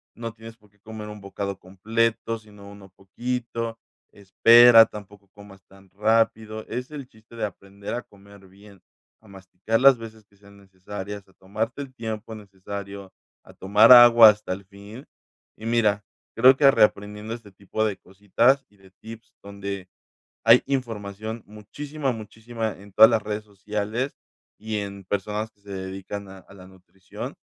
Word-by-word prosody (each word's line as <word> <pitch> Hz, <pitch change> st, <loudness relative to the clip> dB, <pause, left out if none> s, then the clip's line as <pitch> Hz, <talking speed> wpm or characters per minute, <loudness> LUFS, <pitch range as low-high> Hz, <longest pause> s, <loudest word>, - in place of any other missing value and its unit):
No 115 Hz, -1 st, -6 dB
tienes 115 Hz, 0 st, -13 dB
por 105 Hz, -2 st, -26 dB
qué 105 Hz, +1 st, -35 dB
comer 110 Hz, 0 st, -9 dB
un 105 Hz, 0 st, -9 dB
bocado 100 Hz, 0 st, -5 dB
completo, 115 Hz, +5 st, -2 dB
sino 105 Hz, -2 st, -15 dB
uno 100 Hz, -2 st, -15 dB
poquito. 115 Hz, +2 st, -5 dB, 0.4 s
Espera, 115 Hz, +4 st, +7 dB
tampoco 105 Hz, -1 st, -13 dB
comas 100 Hz, -2 st, -15 dB
tan 95 Hz, 0 st, -21 dB
rápido. 110 Hz, +1 st, 0 dB
Es 125 Hz, +4 st, -5 dB
el 145 Hz, -3 st, -8 dB
chiste 110 Hz, 0 st, -20 dB
de 115 Hz, -, -5 dB
aprender 100 Hz, 0 st, -9 dB
a 120 Hz, -, -4 dB
comer 100 Hz, -1 st, -19 dB
bien, 100 Hz, +1 st, -18 dB, 0.4 s
a 110 Hz, -, -21 dB
masticar 100 Hz, +3 st, -4 dB
las 135 Hz, -1 st, +7 dB
veces 110 Hz, -1 st, -11 dB
que 100 Hz, -1 st, -30 dB
sean 100 Hz, 0 st, -19 dB
necesarias, 100 Hz, +1 st, -9 dB
a 95 Hz, -, -25 dB
tomarte 110 Hz, +8 st, -5 dB
el 135 Hz, -2 st, -9 dB
tiempo 110 Hz, -2 st, -6 dB
necesario, 100 Hz, -1 st, -9 dB, 0.3 s
a -, -, -17 dB
tomar 105 Hz, +5 st, +4 dB
agua 120 Hz, -2 st, +10 dB
hasta 105 Hz, -3 st, -2 dB
el 100 Hz, +2 st, -9 dB
fin. 100 Hz, +6 st, -13 dB, 0.5 s
Y 110 Hz, -, -11 dB
mira, 110 Hz, -3 st, +1 dB, 0.3 s
creo 130 Hz, +3 st, +6 dB
que 140 Hz, -1 st, +6 dB
reaprendiendo 105 Hz, -2 st, 0 dB
este 115 Hz, -3 st, -11 dB
tipo 100 Hz, +3 st, -4 dB
de 105 Hz, -3 st, -2 dB
cositas 110 Hz, +8 st, +1 dB
y 105 Hz, -, -28 dB
de 95 Hz, -1 st, -21 dB
tips 115 Hz, 0 st, -12 dB
donde 100 Hz, -2 st, -7 dB, 0.6 s
hay -, -, +7 dB
información, 110 Hz, -4 st, -4 dB
muchísima, 135 Hz, +7 st, -5 dB
muchísima 110 Hz, 0 st, -6 dB
en 100 Hz, +1 st, -15 dB
todas 110 Hz, +2 st, +8 dB
las 115 Hz, -2 st, +1 dB
redes 105 Hz, 0 st, -4 dB
sociales, 105 Hz, +5 st, -4 dB, 0.5 s
y 110 Hz, -1 st, -4 dB
en 100 Hz, -1 st, -8 dB
personas 105 Hz, +3 st, -3 dB
que 100 Hz, -, -38 dB
se 100 Hz, -, -13 dB
dedican 95 Hz, +1 st, -7 dB
a 95 Hz, 0 st, -12 dB
a 95 Hz, -, -19 dB
la 95 Hz, -2 st, -14 dB
nutrición 95 Hz, 0 st, -10 dB
105 Hz, 160 wpm, -24 LUFS, 100-115 Hz, 0.6 s, agua